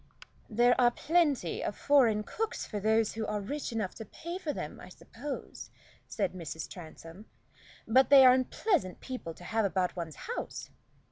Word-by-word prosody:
"There 240 +3 +4
are 240 - +6
plenty 290 - +1
of 205 - -3
foreign 240 -7 +4
cooks 445 - -3
for 210 - -4
those 220 +1 +2
who 220 0 -3
are 210 0 -1
rich 280 +9 -4
enough 220 -5 -2
to 225 - -8
pay 340 - -7
for 320 -5 -2
them, 150 - -6
I - - -11
suppose," 260 +9 -8 0.4
said - - -2
Mrs. 160 -3 -6
Transome, 170 +3 -11 0.6
"but 260 +4 +5
they 275 -2 +9
are 250 - +9
unpleasant 255 - 0
people 250 -11 -6
to - - -14
have 225 +4 0
about 185 -2 0
one's 165 -3 -5
house." 475 - -5
225 Hz, 165 wpm, -30 LUFS, 185-275 Hz, 0.6 s, they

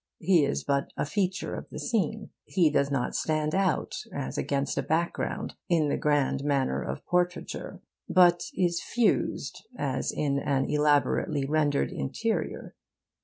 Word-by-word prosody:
He 180 -5 +4
is - - -2
but 140 -1 0
a - - 0
feature 185 +6 -1
of - - -6
the - - -8
scene. 215 -2 -1
He 170 -5 +3
does 140 -1 +2
not 135 -3 -1
stand 155 -1 0
out 190 -2 0
as 65 - -4
against 140 0 -1
a - - +2
background, 165 +2 -1 0.2
in 160 -4 +3
the - - +1
grand 145 -2 +1
manner 135 - +1
of 65 +1 -5
portraiture, 180 0 -2 0.3
but 175 -1 +5
is 175 -2 +1
fused 240 -2 0
as 130 -2 -1
in 140 -2 0
an 135 -1 0
elaborately 145 -2 +2
rendered 145 - +1
'interior. 70 - -3
150 Hz, 145 wpm, -28 LUFS, 140-175 Hz, 0.3 s, but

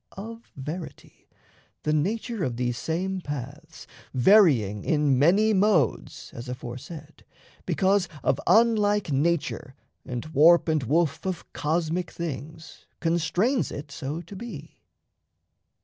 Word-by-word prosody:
Of 225 +4 -9
verity, 155 +6 -8 0.5
the 150 - +1
nature 215 +6 -1
of 120 -6 -2
these 120 -1 -1
same 185 +3 -2
paths, 145 +2 -7 0.3
Varying 125 - +4
in 145 -4 +2
many 200 +9 +4
modes 190 - +1
(as 120 +2 -8
aforesaid) 140 +5 -8 0.4
Because 195 -2 +2
of - - +1
unlike 210 -5 +3
nature 145 -1 -1 0.3
and 125 -2 -5
warp 165 +5 +6
and 155 -2 +1
woof 150 +4 0
Of 185 -2 -5
cosmic 165 +3 -1
things, 160 0 -7
constrains 175 - +1
it 140 0 -7
so 145 +4 -5
to 175 +4 -11
be. 185 -8 -9
160 Hz, 115 wpm, -26 LUFS, 140-190 Hz, 0.5 s, warp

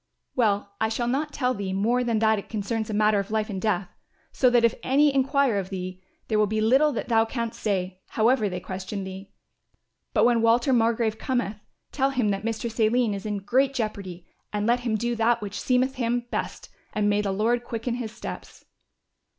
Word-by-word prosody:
"Well, 205 -4 +1
I 220 - +2
shall 235 +2 -1
not 290 +5 -1
tell 255 -3 0
thee 200 -4 -4
more 235 +6 +1
than 235 -2 0
that 220 -1 +3
it - - -11
concerns 220 +1 -2
a - - -3
matter 210 -1 +3
of 200 - -4
life 215 0 -1
and 190 -2 -4
death, 200 -3 0 0.4
so 255 - +3
that 240 -1 +3
if 230 - +3
any 285 +2 +3
enquire 270 -4 +2
of 190 -1 -5
thee, 185 -1 -6 0.3
there 215 -1 +1
will 210 - +4
be 215 +1 -1
little 265 +8 +4
that - - -3
thou 225 -2 +4
canst 230 0 -4
say, 185 -3 -1
however 225 -1 +2
they 180 -1 -4
question 190 +2 -5
thee. 190 +1 -8 0.8
But - - +3
when 235 -1 +3
Walter 235 +3 +3
Margrove 225 -2 +1
cometh, 245 -6 -1 0.3
tell 270 -1 +1
him 250 -6 0
that 195 0 -1
Mistress 230 +1 -3
Aline 225 0 +3
is 200 +1 -5
in 205 -2 -3
great 265 +5 +2
jeopardy 200 -7 -4 0.3
and 210 0 -1
let 240 +2 +3
him 240 -3 -1
do 240 +2 -1
that 230 +1 +3
which 205 -2 -5
seemeth 255 +1 +2
him 240 0 0
best - - -4 0.2
and 210 -1 +1
may 205 0 +2
the 200 -2 -1
Lord 230 +5 +1
quicken 235 0 -3
his 235 -3 -4
steps." - - -9
225 Hz, 205 wpm, -25 LUFS, 205-245 Hz, 0.8 s, will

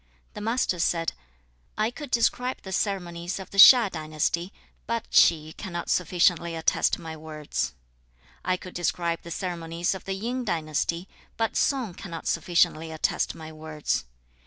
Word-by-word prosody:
The - - -7
Master 225 -5 0
said, 165 -1 +1 0.6
'I 215 +2 +1
could 295 +2 -8
describe 250 +1 +1
the 190 - -7
ceremonies 175 -2 -2
of 190 - -9
the 200 - -2
Hsia 230 -2 +10
dynasty, 155 +3 -2 0.4
but 230 -1 -1
Chi 155 -1 +4
cannot 175 -4 -4
sufficiently 170 -1 +2
attest 160 - +2
my 160 -1 -7
words. 155 - -4 0.7
I 185 0 +1
could 180 0 -10
describe 170 -1 -1
the 170 - -10
ceremonies 170 -1 -2
of 190 - -8
the 195 - -2
Yin 245 +6 -3
dynasty, 170 -1 -1 0.3
but 225 -1 0
Sung 255 -9 +1
cannot 170 -3 -8
sufficiently 170 -1 +2
attest 160 - -1
my 160 0 -9
words. 155 - -3
175 Hz, 145 wpm, -26 LUFS, 165-200 Hz, 0.7 s, Hsia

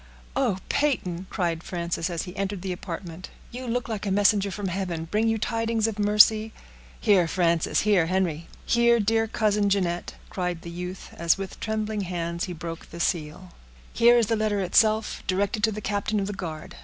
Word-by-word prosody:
"Oh! 250 -8 +1
Peyton," 190 -11 0
cried 170 -3 -1
Frances, 170 -1 -3
as 170 -2 -3
he 180 0 -9
entered 195 -1 -3
the 190 - -2
apartment, 175 -1 -7 0.2
"you 250 +1 -6
look 240 +1 -1
like 215 -3 -4
a - - 0
messenger 200 0 +3
from 195 0 -4
heaven! 175 -3 -3
Bring 210 +6 0
you 225 0 +2
tidings 225 0 0
of 215 -2 -4
mercy?" 215 +1 +5 0.5
"Here, 195 -6 +4
Frances—here, 170 +2 +2
Henry—here, 190 +7 +1
dear 225 +1 +2
cousin 210 -2 +1
Jeanette," 180 -3 -1 0.2
cried 180 -2 -3
the 170 - -7
youth, 180 +2 -6
as 170 +1 +3
with 195 -2 -7
trembling 215 -1 -2
hands 170 -2 -3
he 185 - -6
broke 165 0 -7
the 170 - -9
seal; 170 +1 -2 0.4
"here 240 +1 +6
is 235 - +4
the 225 - +1
letter 215 -2 0
itself, 215 +4 +2
directed 200 +3 0
to 220 - 0
the 215 0 -5
captain 205 +1 -1
of 195 - -1
the 205 - -4
guard. 165 -5 -7
195 Hz, 180 wpm, -26 LUFS, 175-215 Hz, 0.5 s, here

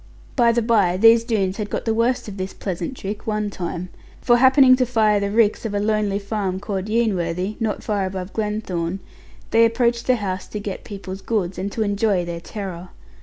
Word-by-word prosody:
By 235 -3 +4
the 235 0 +1
bye, 205 -6 +3
these 230 +3 +6
Doones 200 -5 -1
had 210 -2 -4
got - - -3
the 225 - +1
worst 235 +2 0
of 205 -1 -7
this 190 0 -4
pleasant 185 +6 -4
trick 205 +4 -6
one 210 -1 -1
time. 180 -1 -5 0.3
For 240 -1 +4
happening 260 +1 +6
to 255 - +2
fire 215 -3 +3
the 200 0 -1
ricks 215 0 +2
of 215 -3 -3
a - - +1
lonely 210 -1 0
farm 200 -2 -3
called 195 -2 -3
Yeanworthy, 195 -4 0
not 220 -3 -2
far 200 -3 -1
above 185 0 -6
Glenthorne, 195 -5 -2 0.5
they 230 0 +5
approached 235 0 +1
the 255 - +4
house 190 -4 -4
to 210 - -5
get 200 -2 -5
people's 195 -1 -7
goods, 190 -6 -2
and 195 +2 -3
to 220 - 0
enjoy 205 -3 +1
their 170 -1 -5
terror. 185 -3 -7
205 Hz, 200 wpm, -22 LUFS, 190-225 Hz, 0.5 s, these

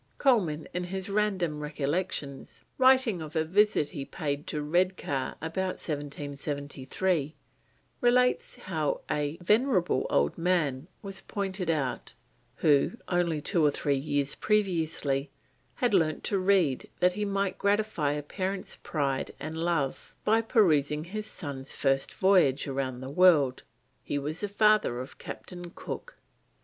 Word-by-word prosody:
Colman 180 - +2
in 180 0 -2
his 190 +2 -4
Random 190 -7 0
Recollections, 150 -1 -3 0.2
writing 260 -8 +5
of 155 +1 -8
a 160 - +2
visit 200 -3 +3
he 145 -6 -5
paid 145 -1 -4
to 150 - -2
Redcar 170 -4 0
about 185 +3 -2
1773, 145 +2 -3 0.7
relates 250 - +3
how - - -2
a 150 +2 -1
venerable 210 - +2
old 70 - +1
man 165 -5 +1 0.2
was 195 -1 -5
pointed 195 -3 -3
out 145 -6 -2 0.4
who: 145 +2 +3 0.2
"only 170 -4 +1
two 165 +2 +2
or 150 - +6
three 145 0 0
years 140 0 -1
previously 160 -9 0 0.5
had 245 -3 +1
learnt 160 -5 +2
to 200 - 0
read 185 -8 +2
that 180 0 +4
he 210 +2 -2
might 195 -1 -1
gratify 200 -8 +1
a 150 0 -3
parent's 190 +5 -3
pride 140 -4 -2
and 155 +2 -5
love 165 -5 -1
by 220 +2 +4
perusing 155 - +3
his 215 +5 -5
son's 140 -8 -6
first 135 -1 +1
voyage 180 -8 +4
round 130 -2 -3
the 130 - -5
world. 150 -6 +5 0.4
He 145 - -2
was 150 +3 -3
the 205 - -3
father 210 - +3
of 130 +2 -8
Captain 175 -1 -8
Cook." - - -7
165 Hz, 135 wpm, -29 LUFS, 145-195 Hz, 0.7 s, or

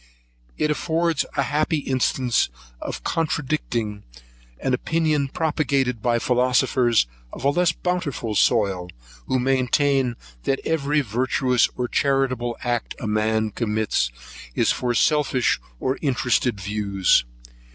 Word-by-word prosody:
It 150 - +1
affords 165 +1 0
a 140 - +3
happy 150 +4 0
instance 130 -3 +1 0.3
of - - -5
contradicting 135 -9 -1 0.6
an 130 - -1
opinion 155 +1 +1
propagated 135 -5 0
by 120 0 +2
philosophers 125 - +2 0.3
of - - -7
a 140 - +5
less 175 +2 +3
bountiful 170 -11 -2
soil, 100 -5 +2 0.4
who 130 - +1
maintain 130 0 +2 0.3
that 135 - +1
every 150 -1 +1
virtuous 125 +1 +1
or 125 - -1
charitable 130 -3 0
act 120 -2 -2
a - - -5
man 110 0 +1
commits, 110 - 0 0.5
is - - +3
from 120 -1 -1
selfish 140 -1 +2 0.2
and 130 +1 -1
interrested 125 -5 +1
views. 100 -1 +2
130 Hz, 115 wpm, -23 LUFS, 115-145 Hz, 0.6 s, a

